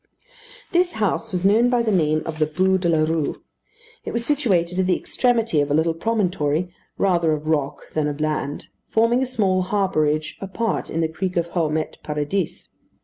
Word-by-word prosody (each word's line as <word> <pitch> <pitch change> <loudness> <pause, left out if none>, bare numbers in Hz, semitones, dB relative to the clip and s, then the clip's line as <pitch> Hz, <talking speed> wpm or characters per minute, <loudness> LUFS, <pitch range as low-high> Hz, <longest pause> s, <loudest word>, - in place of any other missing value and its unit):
This 350 0 +2
house 220 +1 -1
was 180 0 -2
known 225 +5 +5
by 245 -1 +2
the 220 - +1
name 155 -4 +2
of 160 -1 -5
the 155 - +2
Bû 185 +4 +2
de 175 -2 0
la 160 -2 +3
Rue. 160 -2 -2 0.6
It - - -5
was 235 0 -2
situated 190 - +1
at 185 - +2
the 185 - +3
extremity 230 - +1
of 145 - -1
a 145 - +2
little 160 +1 +2
promontory, 180 -4 0 0.2
rather 170 -5 +2
of 150 0 -4
rock 150 -3 -2
than 155 -1 0
of 145 0 -4
land, 150 -2 -2 0.2
forming 230 +3 +2
a 265 - 0
small 195 -7 +1
harbourage 155 -6 0
apart 195 +4 -2
in 165 - -1
the 160 - +2
creek 180 +3 -3
of 170 0 0
Houmet 160 -3 -1
Paradis. 150 +4 -3
180 Hz, 185 wpm, -22 LUFS, 155-210 Hz, 0.6 s, known